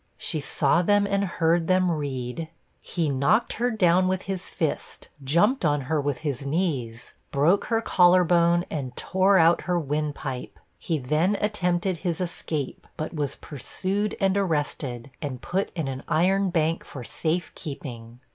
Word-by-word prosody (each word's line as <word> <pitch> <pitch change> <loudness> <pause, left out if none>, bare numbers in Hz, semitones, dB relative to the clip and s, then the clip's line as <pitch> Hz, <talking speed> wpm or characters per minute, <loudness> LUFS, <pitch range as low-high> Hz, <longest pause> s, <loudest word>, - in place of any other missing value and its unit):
She 155 - -1
saw 145 +3 +2
them 205 +3 +3
and 200 0 +1
heard 170 -2 +1
them 185 -1 +3
read 140 -1 -3 0.3
'He 170 -3 -2
knocked 140 - +2
her 245 - +3
down 185 -5 +3
with 185 0 -1
his 190 -1 -4
fist, 160 -3 -3
jumped 180 - +2
on 145 -2 +2
her 145 +3 0
with 145 -1 -1
his 140 -2 -2
knees, 140 -7 -2 0.2
broke 160 +8 +3
her 225 -1 0
collar 180 -2 +5
bone, 175 0 +3
and 130 -5 -4
tore 190 +2 +3
out 165 0 +5
her 180 - +3
wind 150 -1 -2
pipe! 130 -4 -6 0.2
He 165 - -1
then 155 +9 +1
attempted 185 -3 0
his 170 -1 -2
escape, 165 -5 -4
but 155 - -4
was 145 -3 -2
pursued 195 +8 -3
and 195 0 +2
arrested, 145 -8 -2
and 140 -5 -4
put 190 +9 -2
in 160 -5 -2
an 130 0 -4
iron 185 +5 +2
bank 165 -1 0
for 130 - -9
safe 160 - -2
keeping!' 120 -5 -8
165 Hz, 160 wpm, -25 LUFS, 145-185 Hz, 0.3 s, collar